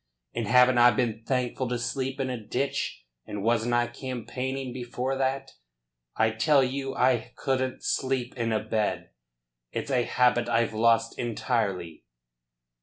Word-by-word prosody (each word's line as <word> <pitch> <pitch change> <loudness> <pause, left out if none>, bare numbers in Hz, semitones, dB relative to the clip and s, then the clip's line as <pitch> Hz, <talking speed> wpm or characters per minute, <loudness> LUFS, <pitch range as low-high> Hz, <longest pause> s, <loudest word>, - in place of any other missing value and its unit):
"And 115 - -2
haven't 125 +1 +5
I 120 0 +8
been 115 -3 -1
thankful 125 0 -1
to 125 0 -1
sleep 130 +3 -3
in 130 -1 -1
a 120 -3 -5
ditch? 125 - -2 0.2
And 105 -1 -5
wasn't 115 +1 +2
I 120 0 +3
campaigning 130 +1 -5
before 125 +1 -3
that? 135 0 -1 0.6
I 110 0 +3
tell 135 +5 +4
you 135 +1 -3
I 125 -3 +1
couldn't 130 -1 -1
sleep 130 -2 -1
in 115 -2 -1
a 110 -1 0
bed. 110 - -1 0.6
It's - - -4
a 125 -2 +3
habit 120 0 +2
I've 115 -1 +1
lost 115 +1 +2
entirely." 105 - -2
125 Hz, 145 wpm, -27 LUFS, 115-130 Hz, 0.6 s, I